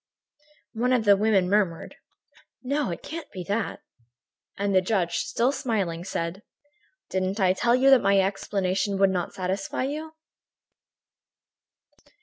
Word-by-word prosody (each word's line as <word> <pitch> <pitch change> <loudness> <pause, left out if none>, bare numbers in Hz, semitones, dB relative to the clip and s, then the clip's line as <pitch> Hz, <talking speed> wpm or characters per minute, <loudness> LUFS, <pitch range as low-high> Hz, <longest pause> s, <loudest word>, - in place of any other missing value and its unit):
One 245 +3 +1
of 235 -3 +1
the 200 -1 +7
women 200 -2 +2
murmured: 190 -4 0 0.7
"No, 280 0 -1
it 170 - -6
can't 330 0 -7
be 185 - -6
that." 200 +4 -3 0.8
And 200 0 -1
the 185 - +5
judge, 180 -3 0
still 245 +3 0
smiling, 210 - -2
said: 175 0 -4 0.7
"Didn't 190 +2 -1
I 185 -2 +4
tell 235 +5 +2
you 270 +2 +4
that 265 - +7
my 195 0 +3
explanation 195 0 -1
would 195 0 +4
not 180 -2 -3
satisfy 190 +5 -2
you?" 305 +4 -4
200 Hz, 130 wpm, -25 LUFS, 185-240 Hz, 0.8 s, the